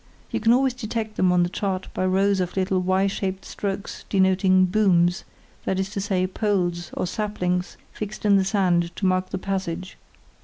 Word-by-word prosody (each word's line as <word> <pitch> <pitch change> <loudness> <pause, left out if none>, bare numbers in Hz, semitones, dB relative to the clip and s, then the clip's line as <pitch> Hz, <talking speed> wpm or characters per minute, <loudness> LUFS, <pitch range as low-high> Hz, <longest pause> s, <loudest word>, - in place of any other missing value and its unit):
You - - -1
can 225 +1 +3
always 260 +1 +3
detect 225 -2 -4
them 185 -1 +3
on 180 -1 +4
the 175 - 0
chart 190 0 -2
by 185 - 0
rows 195 +1 +2
of 180 +1 -2
little 190 0 +1
Y 185 +1 +2
shaped 195 -1 -3
strokes 200 0 -5
denoting 190 -1 +4
"booms", 180 -1 +2 0.4
that 190 - 0
is 190 +1 -2
to 200 - -3
say, 190 -2 0
poles 185 -3 -1
or - - -1
saplings 180 -2 -2
fixed 210 0 -6
in 205 -1 +5
the 195 - +4
sand 180 -3 +1
to 195 - -3
mark 185 0 +1
the - - -3
passage. 185 -1 -4
190 Hz, 185 wpm, -24 LUFS, 185-200 Hz, 0.4 s, in